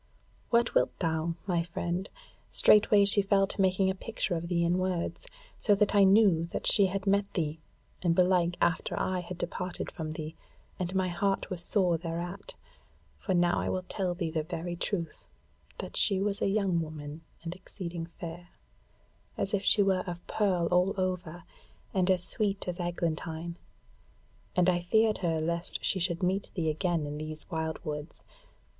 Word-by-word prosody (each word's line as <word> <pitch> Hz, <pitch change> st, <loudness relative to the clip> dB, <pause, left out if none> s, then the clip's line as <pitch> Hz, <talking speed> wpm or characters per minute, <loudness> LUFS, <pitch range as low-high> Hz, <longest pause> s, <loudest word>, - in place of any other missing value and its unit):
"What 235 Hz, 0 st, +3 dB
wilt -, -, +2 dB
thou, 165 Hz, -1 st, -1 dB
my 175 Hz, -4 st, +1 dB
friend? 175 Hz, +2 st, -3 dB, 0.4 s
Straightway 210 Hz, -1 st, +6 dB
she 205 Hz, +1 st, +6 dB
fell 195 Hz, 0 st, +3 dB
to 195 Hz, -, -2 dB
making 190 Hz, 0 st, +3 dB
a -, -, -2 dB
picture 200 Hz, 0 st, -3 dB
of 170 Hz, 0 st, -2 dB
thee 170 Hz, -1 st, +1 dB
in 175 Hz, +2 st, +2 dB
words; 185 Hz, -, -2 dB, 0.3 s
so 205 Hz, -, +4 dB
that 210 Hz, +1 st, +2 dB
I 200 Hz, -1 st, +6 dB
knew 190 Hz, -4 st, +5 dB
that 170 Hz, -, -5 dB
she 200 Hz, -3 st, +6 dB
had 190 Hz, +1 st, -3 dB
met 200 Hz, 0 st, +2 dB
thee, 155 Hz, -3 st, -1 dB, 0.4 s
and 170 Hz, -2 st, +2 dB
belike 180 Hz, -1 st, +3 dB
after 165 Hz, -, 0 dB
I 185 Hz, -1 st, 0 dB
had 175 Hz, 0 st, -7 dB
departed 180 Hz, +1 st, -4 dB
from 155 Hz, -1 st, -5 dB
thee, 155 Hz, +1 st, -6 dB, 0.4 s
and 180 Hz, +1 st, -3 dB
my 185 Hz, -1 st, +1 dB
heart 195 Hz, +3 st, -1 dB
was 180 Hz, -2 st, -2 dB
sore 180 Hz, -4 st, +2 dB
thereat; 175 Hz, +4 st, -5 dB, 0.6 s
for 190 Hz, -, -1 dB
now 175 Hz, 0 st, +3 dB
I -, -, -1 dB
will 185 Hz, -, -1 dB
tell 185 Hz, -1 st, -2 dB
thee 170 Hz, -3 st, -2 dB
the 160 Hz, -1 st, 0 dB
very 165 Hz, +3 st, -4 dB
truth, 170 Hz, -2 st, -3 dB, 0.5 s
that -, -, -6 dB
she 195 Hz, -3 st, +4 dB
was 200 Hz, 0 st, -1 dB
a -, -, +2 dB
young 195 Hz, -4 st, +1 dB
woman 155 Hz, -1 st, -7 dB, 0.2 s
and 165 Hz, 0 st, -4 dB
exceeding 175 Hz, -3 st, -7 dB
fair, 170 Hz, +1 st, -9 dB, 0.9 s
as 195 Hz, -, -2 dB
if 200 Hz, -, +2 dB
she 205 Hz, -, +4 dB
were 190 Hz, -2 st, +2 dB
of 175 Hz, 0 st, -6 dB
pearl 185 Hz, -5 st, +1 dB
all 180 Hz, +2 st, +3 dB
over, 180 Hz, -2 st, -2 dB, 0.5 s
and 185 Hz, -1 st, +2 dB
as 185 Hz, -2 st, +3 dB
sweet 200 Hz, -2 st, -1 dB
as 180 Hz, 0 st, -3 dB
eglantine; 170 Hz, -1 st, -3 dB, 1.0 s
and 180 Hz, 0 st, +3 dB
I 175 Hz, -1 st, +3 dB
feared 220 Hz, +4 st, +2 dB
her 165 Hz, -3 st, 0 dB
lest 170 Hz, +2 st, -2 dB
she 190 Hz, -, +1 dB
should 175 Hz, 0 st, 0 dB
meet 190 Hz, +2 st, 0 dB
thee 160 Hz, -4 st, +1 dB
again 165 Hz, -1 st, -1 dB
in 145 Hz, +1 st, -5 dB
these 155 Hz, 0 st, -6 dB
wildwoods. 160 Hz, -1 st, -4 dB
180 Hz, 175 wpm, -30 LUFS, 170-195 Hz, 1.0 s, Straightway